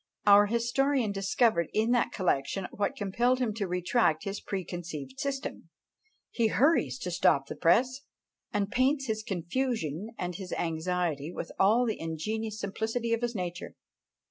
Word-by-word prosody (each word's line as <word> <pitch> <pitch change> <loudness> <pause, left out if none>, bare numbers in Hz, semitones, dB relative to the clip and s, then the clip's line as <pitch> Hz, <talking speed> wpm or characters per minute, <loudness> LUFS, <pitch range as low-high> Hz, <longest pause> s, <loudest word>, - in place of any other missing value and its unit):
Our 205 0 +7
historian 235 +1 +1
discovered 195 -2 +2
in 220 +2 +2
that 245 -1 +2
collection 185 0 0
what 205 - -1
compelled 235 +6 +1
him 245 -4 -1
to 205 -2 -2
retract 180 -1 +1
his 200 0 -4
preconceived 170 -8 -5
system 275 0 -4 0.6
he 230 -2 +2
hurries 230 - +2
to 180 - -3
stop 150 -5 +3
the - - -7
press, 250 +10 +3 0.5
and 205 -2 -1
paints 270 +2 +2
his 220 -3 -2
confusion 195 - -2
and 180 0 -3
his 180 0 -6
anxiety 165 -2 -1
with - - -6
all 220 +6 +4
the 220 -3 -2
ingenuous 215 +7 -3
simplicity 225 +4 -2
of 230 - 0
his 240 -1 -2
nature. 180 -2 -5
205 Hz, 145 wpm, -29 LUFS, 175-235 Hz, 0.6 s, Our